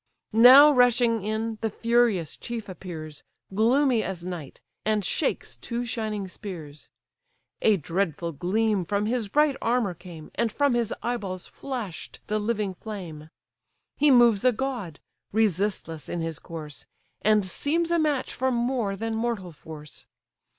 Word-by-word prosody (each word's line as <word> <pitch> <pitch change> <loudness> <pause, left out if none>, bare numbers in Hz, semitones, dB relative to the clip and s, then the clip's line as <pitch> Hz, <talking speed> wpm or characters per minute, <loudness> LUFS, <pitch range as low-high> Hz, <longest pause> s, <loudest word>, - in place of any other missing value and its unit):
Now 260 +6 +9
rushing 240 -4 +3
in, 220 +1 -2
the 225 - 0
furious 230 -7 +1
chief 235 -3 -6
appears, 160 -5 -8 0.3
Gloomy 240 +3 +3
as 185 -4 -5
night! 175 -6 -7 0.2
and 215 -2 +1
shakes - - -1
two 240 0 -4
shining 215 -4 -3
spears: 165 -7 -9 0.7
A 215 -2 +4
dreadful 170 0 -2
gleam 195 +6 0
from 200 +4 -1
his 230 -1 -1
bright 295 +4 +3
armour 230 -5 +1
came, 170 -3 -12
And 230 +1 0
from 285 +3 +2
his 235 -2 0
eye 240 +1 0
balls 185 -4 -6
flash'd 240 -11 -6
the 215 +1 -1
living 210 -2 -1
flame. 175 -7 -8 0.7
He 295 +1 +4
moves 240 -6 +5
a 255 - +5
god, 235 - -4 0.3
resistless 195 -7 -1
in 175 - -3
his 165 -2 -4
course, 155 -3 -8 0.3
And 215 -2 +3
seems 330 - -1
a 340 - +3
match 300 -4 0
for 260 +1 0
more 240 -4 0
than 225 +3 -3
mortal 220 -5 -2
force. 150 -3 -11
215 Hz, 145 wpm, -26 LUFS, 180-240 Hz, 0.7 s, Now